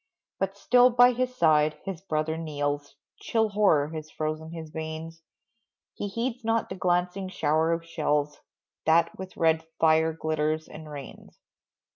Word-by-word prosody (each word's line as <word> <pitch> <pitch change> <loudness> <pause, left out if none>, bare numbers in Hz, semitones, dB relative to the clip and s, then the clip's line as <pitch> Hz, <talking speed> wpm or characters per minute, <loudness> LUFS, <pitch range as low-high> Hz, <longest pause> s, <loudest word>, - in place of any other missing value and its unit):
But 195 +1 -2
still 245 +4 +5
by 245 0 +6
his 250 +1 -2
side 155 -6 +3
his 195 -4 -5
brother 160 -3 -1
kneels, 145 -3 -3 0.2
Chill 220 -1 +1
horror 195 -8 +3
has 155 -1 -7
frozen 155 +1 -4
his 160 -2 -8
veins; 160 +1 -6 0.7
He 205 - -4
heeds 235 +4 -3
not 225 0 0
the 190 - -5
glancing 180 +1 0
shower 160 -1 +1
of 165 0 -1
shells, 150 -3 -1 0.5
That 165 +1 +4
with 190 0 -8
red 160 -1 +3 0.2
fire 160 0 +4
glitters 155 0 -1
and 155 0 -10
rains. 145 -3 -10
160 Hz, 145 wpm, -27 LUFS, 155-195 Hz, 0.7 s, by